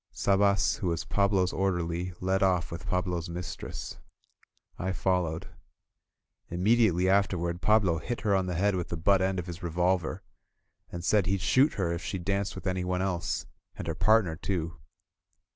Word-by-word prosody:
Sabas, 100 0 +2
who 95 - -3
was 85 -1 -1
Pablo's 100 0 +1
orderly, 90 -2 -1
led 95 +2 0
off 90 -3 +2
with 85 +1 -7
Pablo's 90 -2 -1
mistress. 90 +1 -6 0.8
I 95 +1 -1
followed. 90 -4 0 1.0
Immediately 95 0 +3
afterward 90 -3 +1
Pablo 100 -5 +3
hit 120 +8 -4
her 105 -3 +2
on 95 -1 +1
the 90 - -2
head 100 +4 +2
with 90 -1 -2
the 85 - -3
butt 95 +4 +3
end 95 0 0
of 90 - -3
his 85 -1 -7
revolver, 90 0 0 0.7
and 85 0 -6
said 105 -4 +3
he'd 95 0 0
shoot 135 - +4
her 90 -4 -1
if 85 0 -3
she 95 - -3
danced 100 +2 -2
with - - -8
anyone 90 0 -1
else, 90 -3 -2 0.3
and - - -6
her 80 - -2
partner 105 -1 +3
too. 85 -1 -3
90 Hz, 160 wpm, -29 LUFS, 85-100 Hz, 1.0 s, shoot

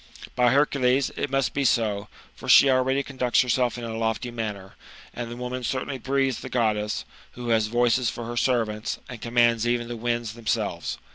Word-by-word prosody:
By 125 -1 +4
Hercules, 135 -2 +2
it 145 - -2
must 135 -4 0
be 140 - 0
so, 105 -5 +1 0.3
for - - -9
she 140 - +8
already 130 +2 +2
conducts 130 -3 +1
herself 125 -1 +1
in 120 - -6
a 115 -1 -4
lofty 115 +2 -2
manner; 105 -4 -5 0.4
and 120 -1 -5
the 120 - -7
woman 125 +1 -4
certainly 130 +2 -3
breathes 135 0 0
the 130 - -8
Goddess, 105 -4 0
* - - -25
who 120 -1 -6
has 110 -2 +3
voices 120 +1 +2
for 120 - -6
her 120 +1 -5
servants, 115 -3 0
and 120 -3 -9
commands 120 -1 +2
even 120 0 0
the 120 - -4
winds 120 -1 -2
themselves. 115 -1 -2
120 Hz, 190 wpm, -25 LUFS, 115-130 Hz, 0.4 s, she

